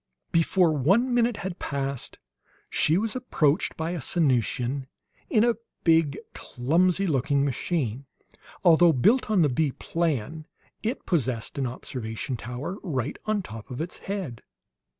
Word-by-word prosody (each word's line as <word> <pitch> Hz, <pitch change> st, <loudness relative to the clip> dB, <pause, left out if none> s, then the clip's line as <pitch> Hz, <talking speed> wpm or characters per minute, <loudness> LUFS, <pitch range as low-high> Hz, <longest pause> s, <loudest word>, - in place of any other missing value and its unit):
Before 170 Hz, 0 st, +3 dB
one 195 Hz, -, +3 dB
minute 240 Hz, -2 st, +2 dB
had 190 Hz, -2 st, -4 dB
passed 140 Hz, -2 st, -4 dB, 0.5 s
she 160 Hz, +3 st, +3 dB
was 215 Hz, +3 st, 0 dB
approached 160 Hz, -, +1 dB
by 160 Hz, +1 st, -2 dB
a 175 Hz, -3 st, -3 dB
Sanusian 130 Hz, -2 st, 0 dB, 0.4 s
in 215 Hz, -, +4 dB
a 240 Hz, 0 st, +4 dB, 0.3 s
big, 160 Hz, -4 st, +3 dB, 0.2 s
clumsy 175 Hz, +9 st, +1 dB
looking 140 Hz, -3 st, +1 dB
machine. 135 Hz, -2 st, -2 dB, 0.6 s
Although 170 Hz, -1 st, +6 dB
built 215 Hz, -, +3 dB
on 200 Hz, -6 st, +4 dB
the -, -, +4 dB
bee 140 Hz, +2 st, 0 dB
plan, 155 Hz, -2 st, -2 dB, 0.3 s
it 225 Hz, +3 st, -3 dB
possessed 130 Hz, -, -1 dB
an 135 Hz, -, 0 dB
observation 120 Hz, 0 st, -5 dB
tower 125 Hz, -, -5 dB
right 140 Hz, -, -3 dB
on 215 Hz, -2 st, +1 dB
top 110 Hz, -2 st, -9 dB
of 125 Hz, -, -6 dB
its 165 Hz, +3 st, -4 dB
"head." 185 Hz, -, -4 dB
155 Hz, 135 wpm, -26 LUFS, 130-180 Hz, 0.6 s, Although